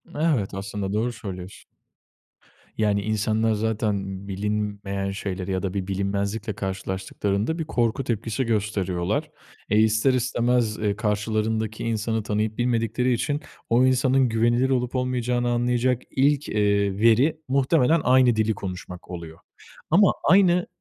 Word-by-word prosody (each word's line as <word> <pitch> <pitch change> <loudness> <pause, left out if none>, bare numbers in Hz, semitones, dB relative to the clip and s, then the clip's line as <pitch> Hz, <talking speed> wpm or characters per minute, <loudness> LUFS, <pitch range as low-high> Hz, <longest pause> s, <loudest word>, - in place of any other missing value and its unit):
Evet 145 -12 0
aslında 100 0 -4
doğru 120 +3 0
söylüyorsun. 95 -4 -8 1.1
Yani 105 -2 +1
insanlar 110 +1 0
zaten 105 -3 -2
bilinmeyen 100 -1 -2
şeyleri 95 -1 -4
ya 95 +1 -1
da 95 -1 -2
bir 95 -1 -3
bilinmezlikle 100 +3 -2
karşılaştıklarında 100 - -3
bir - - 0
korku 120 -1 0
tepkisi 115 +1 -2
gösteriyorlar. 100 -5 -1 0.4
E, 105 +1 +3
ister 110 +4 +3
istemez, 120 -2 +1
ııı, 105 -2 -1
karşılarındaki 110 +1 -1
insanı 110 -1 -1
tanıyıp 105 0 -1
bilmedikleri 120 +1 +1
için 135 +6 -1 0.3
o 120 +2 +4
insanın 130 0 +3
güvenilir 120 +3 +2
olup 125 -1 0
olmayacağını 125 -1 0
anlayacak 120 +1 +1
ilk, 140 +2 +2
eee, 100 -1 +1
veri 120 +8 +4
muhtemelen 140 +3 +3
aynı 125 -2 +4
dili 110 0 +1
konuşmak 90 -2 -8
oluyor 85 -2 -8 0.5
ama 195 +3 +6
aynı 180 -2 +4
110 Hz, 125 wpm, -24 LUFS, 100-125 Hz, 1.1 s, ama